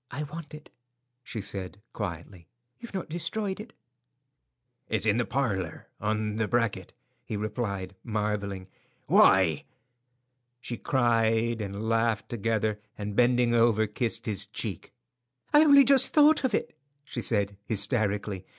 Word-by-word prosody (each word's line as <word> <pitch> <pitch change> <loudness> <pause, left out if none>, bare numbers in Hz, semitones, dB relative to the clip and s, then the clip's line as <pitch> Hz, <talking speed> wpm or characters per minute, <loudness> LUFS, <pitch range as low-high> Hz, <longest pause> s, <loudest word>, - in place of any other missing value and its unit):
"I 150 - -4
want 150 +1 -8
it," 150 - -14 0.5
she 115 -3 -5
said, 95 0 -4
quietly. 85 -3 -6 0.3
"You've 235 -4 -10
not 190 - -3
destroyed 190 +5 -3
it?" 215 +1 -10 1.2
"It's 110 -1 +1
in 105 0 +3
the 120 - +1
parlour, 100 - -2
on 105 0 -2
the 110 -1 0
bracket," 115 -6 -1 0.3
he 105 - -5
replied, 100 -3 -3
marvelling. 105 -4 -3 0.4
"Why?" 90 -6 +4 1.0
She 120 -1 -6
cried 115 -3 +1
and 100 +2 -5
laughed 115 -1 0
together, 110 -1 -1 0.2
and 105 -1 -5
bending 120 0 +3
over, 115 -2 +3
kissed 115 +2 -2
his 105 -5 -1
cheek. - - -4 0.6
"I 295 +1 +8
only 280 -2 +7
just 270 -1 +6
thought 305 0 +6
of 250 -5 +1
it," - - -3 0.3
she 125 -4 -5
said, 100 -3 0
hysterically. 105 -2 -1
110 Hz, 130 wpm, -27 LUFS, 100-125 Hz, 1.2 s, I